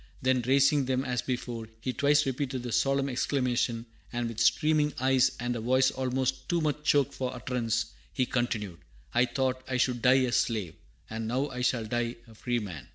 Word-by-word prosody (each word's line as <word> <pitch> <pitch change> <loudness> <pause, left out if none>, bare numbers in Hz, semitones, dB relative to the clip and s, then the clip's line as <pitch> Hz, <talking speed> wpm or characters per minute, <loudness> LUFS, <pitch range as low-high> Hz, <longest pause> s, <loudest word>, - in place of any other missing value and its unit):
Then 130 0 +2
raising 140 +1 +4
them 130 +1 0
as 125 -2 -1
before, 120 -3 -4
he 130 +3 -3
twice 145 +2 +3
repeated 130 -1 -2
the 120 - -4
solemn 135 +3 +2
exclamation, 125 -3 0 0.3
and 120 -1 -2
with 115 -1 -6
streaming 150 +5 +3
eyes 130 0 +3
and 120 0 -2
a - - -3
voice 130 +3 +3
almost 130 0 -2
too 175 - +2
much 150 -2 -1
choked 145 -3 +3
for 130 -1 -3
utterance, 115 -3 -1 0.2
he 130 - 0
continued, 110 - -2 0.3
"I 120 +1 +4
thought 130 0 -1
I 130 - -1
should 125 -1 +1
die 130 +2 +5
a 125 - 0
slave, 110 -8 0 0.3
and 110 0 -4
now 130 +5 0
I 125 -2 -5
shall 120 -2 +1
die 120 +1 -1
a 115 - -15
free 120 +3 -2
man!" 90 - -6
125 Hz, 190 wpm, -29 LUFS, 120-135 Hz, 0.3 s, die